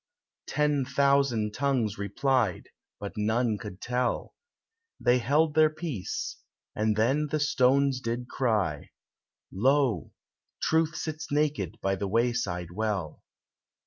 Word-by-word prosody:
Ten 150 -2 +1
thousand 135 -5 +2
tongues 125 -8 0
replied, 105 0 0 0.3
but 100 - -5
none 110 +1 +1
could 100 -2 -8
tell: 125 +1 -1 0.7
They 125 0 +3
held 145 +6 +2
their 155 0 +5
peace, 155 - -4 0.4
and 110 0 +1
then 135 +8 +2
the 155 +1 -1
stones 135 -1 +3
did 120 +1 -3
cry— 105 - -1 0.6
"Lo! 125 - +2 0.5
Truth 160 0 +1
sits 155 -2 -5
naked 150 -5 0
by 95 - +1
the 100 +1 -2
wayside 100 -6 0
well." 95 -5 -3
125 Hz, 115 wpm, -28 LUFS, 105-140 Hz, 0.7 s, their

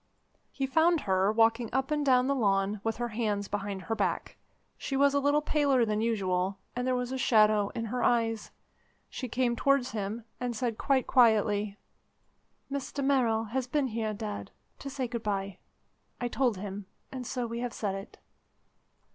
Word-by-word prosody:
He 270 - -2
found 320 +4 +3
her 190 0 +2
walking 230 +1 +3
up 265 +3 -1
and 300 -1 +1
down 255 -2 +4
the 280 - +2
lawn 200 -4 +1
with 225 -1 -1
her 240 0 -2
hands 210 -3 -1
behind 200 -2 -4
her 225 - -2
back. - - -1 0.4
She 270 - -3
was 280 0 +4
a 285 - +3
little 290 +2 +2
paler 280 -6 +3
than 215 -1 0
usual, 195 -4 0 0.2
and 245 +1 -2
there 255 - +2
was 250 0 -2
a 265 - -3
shadow 215 -4 +4
in 230 - -2
her 245 +3 -3
eyes. 225 -2 +1 0.6
She 255 - -4
came 240 0 0
towards 275 0 +2
him, 215 +1 -4
and 245 -1 -2
said 230 -1 -2
quite 270 -2 +2
quietly: 210 -4 +3 0.9
"Mr 280 0 -3
Merrill 240 -5 +2
has 245 +3 -3
been 285 +2 +1
here, 220 -1 -2
Dad, 210 0 -5 0.3
to 275 - -6
say 265 -2 -3
good 235 -1 -4
bye. 195 -3 -3 0.6
I 245 - -1
told 245 -5 +1
him, 200 0 -6 0.2
and 255 -2 -6
so 250 -2 -2
we 235 0 -4
have 245 0 -2
said 205 -4 -2
it." 195 0 -8
230 Hz, 180 wpm, -29 LUFS, 210-260 Hz, 0.9 s, down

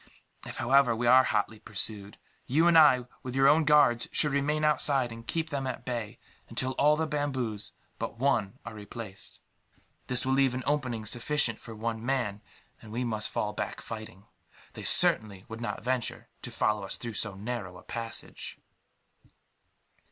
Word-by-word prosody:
"If, - - -8
however, 125 -1 +4
we 120 +2 -2
are 130 +2 +7
hotly 105 +1 -1
pursued, 105 -2 -3 0.3
you 155 +6 +3
and 170 -1 +5
I, 145 -6 +6 0.2
with 130 0 -6
your 135 0 +5
own 155 +2 +5
guards, 135 -6 +4
should 150 - +4
remain 145 +2 0
outside, 140 -4 +3
and 115 0 -10
keep 160 -1 -2
them 135 -2 -2
at 125 - -5
bay 115 -4 -4 0.3
until 130 - -1
all 150 +3 +3
the 160 - 0
bamboos 130 -8 -3 0.3
but - - -4
one 120 -4 0
are 120 - -7
replaced. 105 -1 -7 0.7
This 125 0 -1
will 130 - +1
leave 135 -2 +3
an 130 - -4
opening 130 -7 -1
sufficient 120 +1 +1
for 115 - -10
one 110 +1 -4
man, 120 -6 -1 0.4
and 110 - -12
we 120 +3 -2
must 110 -3 -2
fall 105 0 -2
back - - -4
fighting. 110 -3 -9 0.5
They - - -8
certainly 100 -3 +4
would 110 +1 -8
not 120 - -4
venture 125 0 -3
to - - -7
follow 105 -1 0
us 95 - -2
through 115 -2 -6
so 105 -1 +1
narrow 100 -3 -5
a - - -14
passage." 115 -1 -3
120 Hz, 170 wpm, -29 LUFS, 110-135 Hz, 0.7 s, are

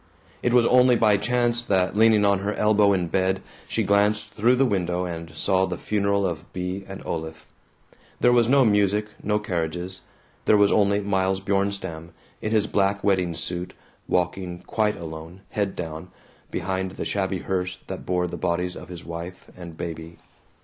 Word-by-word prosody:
It 120 - +1
was 120 -1 +5
only 125 0 +5
by 105 -3 +4
chance 120 +2 +1
that, 95 -4 +1
leaning 110 -1 +5
on 100 -1 +3
her 100 +2 -2
elbow 105 -1 +4
in 90 -3 +1
bed, 95 +2 +1 0.3
she - - 0
glanced 105 +1 +2
through 120 +4 +3
the 135 +2 +3
window 90 -5 0
and 85 -2 -6
saw 95 +3 +2
the 90 -2 -4
funeral 100 -1 0
of 85 -2 -4
Bea 90 +2 -3
and 95 0 -8
Olaf. 80 -1 -5 0.7
There 125 - +5
was 120 -1 +4
no 135 -1 +5
music, 105 0 +2 0.2
no 105 +1 +1
carriages. 90 -1 -3 0.4
There 105 - +5
was 100 -1 +4
only 100 -1 +3
Miles 95 -1 0
Bjornstam, 95 -4 -2 0.3
in 110 - -2
his 110 -2 +3
black 100 -1 +1
wedding 90 -4 +1
suit, 85 +2 -4 0.3
walking 90 0 -1
quite 105 -1 0
alone, 80 +2 -8
head 100 -2 -1
down, 80 +2 -6 0.4
behind 95 +1 -2
the - - -5
shabby 95 -1 -1
hearse 90 0 -2
that 95 - -6
bore 90 -1 0
the 90 - -5
bodies 90 +1 -1
of - - -10
his 90 -1 -9
wife 85 +2 -8
and 85 -3 -10
baby. 80 0 -6
95 Hz, 170 wpm, -24 LUFS, 90-105 Hz, 0.7 s, was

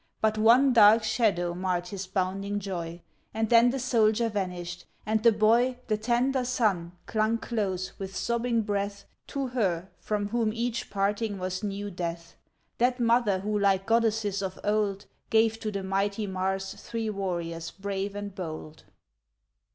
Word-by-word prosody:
But 220 0 +2
one 240 +5 +5
dark 220 0 +7
shadow 205 -6 +1
marred 180 -1 -2
his 195 -1 -5
bounding 195 +2 -1
joy; 175 -3 -5 0.3
And 220 0 -1
then 235 +1 +7
the 265 - -1
soldier 230 -2 +2
vanished, 180 -4 -4 0.2
and 220 0 +1
the 230 0 +6
boy, 230 +4 +3
The 215 - +2
tender 245 +4 +1
son, 205 -9 0
clung 220 +1 +1
close, 195 -6 -2
with 195 -1 -6
sobbing 235 -1 0
breath, 200 -1 -3 0.2
To 275 -2 -3
her 190 -7 -1
from 205 -1 -2
whom 225 -1 0
each 235 0 -2
parting 205 +1 -1
was 185 0 -3
new 205 -1 -4
death; 170 -1 -5 0.4
That 250 +1 +2
mother 230 -5 +3
who 210 +1 -1
like 195 -1 +2
goddesses 225 -3 +1
of 190 -1 -4
old, 205 -1 0 0.2
Gave 225 0 +3
to 215 - -3
the 200 -1 -4
mighty 200 +2 -1
Mars, 190 0 -2
three 225 -2 -3
warriors 170 -4 -3
brave 200 +1 -4
and 205 -1 -5
bold, 155 -4 -6
VI. - - -32
205 Hz, 155 wpm, -28 LUFS, 190-225 Hz, 0.4 s, dark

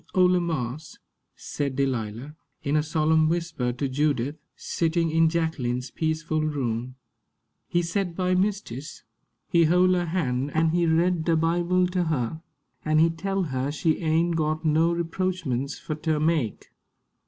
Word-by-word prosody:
"Ole 180 -1 +5
marse," 155 -4 -4 0.4
said 140 -3 -4
Delilah, 130 0 -2 0.3
in 140 +1 0
a 155 - +4
solemn 155 0 +2
whisper 165 -7 -1
to 135 +3 -2
Judith, 140 0 0 0.2
sitting 165 0 0
in 165 0 +4
Jacqueline's 130 -7 -2
peaceful 160 0 -1
room, 130 -5 -2 0.7
"he 175 0 +1
set 175 0 -2
by 185 0 +1
mistis. 185 - -2 0.4
He 170 -1 +4
hole 180 +3 +4
her 175 -1 0
han' 140 -6 -1
an' 160 0 +3
he 170 0 +2
read 165 +1 +2
de 165 - +3
Bible 175 +3 +2
ter 180 0 0
her, 155 0 -2 0.4
an' 155 0 +2
he 165 +1 +5
tell 195 +3 -2
her 130 -3 -2
she 155 +2 0
ain' 165 +1 +1
got 155 0 -1
no 160 +2 +3
reproachments 170 -6 -2
fur 155 - -5
ter 155 0 -1
make. 155 -8 -1
160 Hz, 145 wpm, -25 LUFS, 140-170 Hz, 0.7 s, Ole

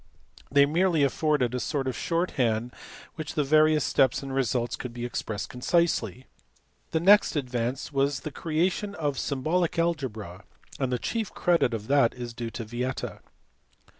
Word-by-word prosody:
They 140 0 +5
merely 165 +1 +2
afforded 140 -3 +1
a 125 - -1
sort 135 0 -2
of 130 - -2
short 170 +2 -1
hand 120 -2 0
by - - -21 0.4
which 155 -1 -5
the 150 - +2
various 155 +1 +4
steps 135 0 +2
and 135 -1 -5
results 125 -2 0
could 125 -2 -7
be 120 0 -4
expressed 110 -4 -4
concisely. 125 - 0 0.6
The 160 - 0
next 200 +3 +5
advance 125 0 -2
was 135 -1 +1
the 155 - -5
creation 175 +7 -1
of 145 -5 -2
symbolic 160 +6 0
algebra, 120 - -2 0.4
and 130 -2 0
the 125 - +1
chief 225 - -3
credit 170 -8 +2
of 105 -1 -6
that 135 -2 +3
is 120 -2 -6
due 115 0 -5
to 115 0 -6
Vieta. 125 +3 -4
135 Hz, 165 wpm, -27 LUFS, 120-155 Hz, 0.6 s, They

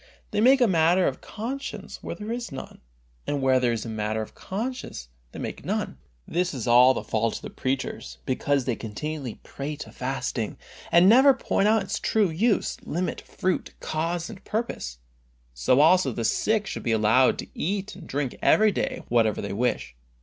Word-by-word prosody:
They 210 - +1
make 260 +3 +6
a 245 - +6
matter 175 0 +4
of - - -3
conscience 250 +6 -6
where - - -5
there 215 +1 -6
is 235 -4 -4
none, 135 - -8 0.5
and 145 - 0
where 130 -1 +3
there 125 -1 +2
is 115 -1 -3
matter 110 -1 -2
of - - -12
conscience 205 - -5 0.2
they - - -10
make - - -5
none. - - -2 0.3
This 175 -1 -1
is 125 - -4
all 125 +2 +7
the - - -3
fault 110 0 0
of - - -7
the - - -7
preachers, 130 - -3
because 135 +1 0
they 125 - 0
continually 130 +3 -5
prate 150 +2 -6
of - - -15
fasting, 125 -4 -3 0.3
and 170 +2 +7
never 265 +5 +7
point 205 -5 +1
out 220 -1 +3
its - - -3
true 210 -6 +2
use, 205 +6 +1
limit, 175 +3 -3
fruit, 185 0 -2
cause 165 +2 -2
and 205 -4 -10
purpose. 215 - -3 0.6
So 65 - +3
also 160 -3 +5
the 115 -1 -3
sick 215 - +1
should - - -5
be 115 - 0
allowed 110 +4 +4
to - - -6
eat 195 +3 -2
and 185 - -11
to 165 - -11
drink 135 -2 -3
every 215 0 +5
day - - -2
whatever 115 -3 +2
they - - -4
wish. 100 - -1
150 Hz, 185 wpm, -26 LUFS, 120-200 Hz, 0.6 s, all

